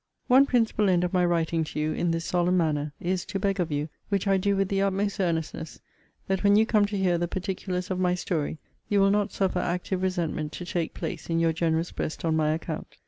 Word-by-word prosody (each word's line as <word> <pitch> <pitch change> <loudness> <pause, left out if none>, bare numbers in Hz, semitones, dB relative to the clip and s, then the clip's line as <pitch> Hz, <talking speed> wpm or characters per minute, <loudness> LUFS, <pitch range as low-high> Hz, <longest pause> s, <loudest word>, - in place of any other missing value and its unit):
One 270 +2 +6
principal 225 -5 +2
end 180 -1 +3
of 180 - -1
my 180 -1 +3
writing 165 -1 +1
to 150 - -5
you, 155 +1 0
in 175 - 0
this 165 0 -1
solemn 180 +1 +2
manner, 150 -3 0
is, 180 +1 -1
to - - -3
beg 195 0 0
of 170 -3 0
you, 145 +1 -1 0.2
which 200 -1 0
I 195 -1 +3
do 200 +1 +1
with 195 -1 0
the 195 -1 +1
utmost 200 +1 0
earnestness, 165 -3 -2 0.5
that 190 0 -1
when 200 0 +5
you 220 +1 +5
come 215 -2 +3
to 205 0 -3
hear 180 -3 +2
the 175 - 0
particulars 185 0 -3
of 185 - -1
my 180 -1 +2
story, 160 -4 -2 0.3
you 205 - +3
will 195 0 +5
not 205 0 +1
suffer 190 -2 0
active 180 +2 -2
resentment 170 -5 -2
to 175 - -6
take 170 -1 -2
place 165 -3 -5
in 165 - +1
your 165 -1 +2
generous 165 +1 0
breast 155 - -4
on 160 -1 +2
my 155 -1 +2
account. 160 0 -4
180 Hz, 235 wpm, -27 LUFS, 165-195 Hz, 0.5 s, One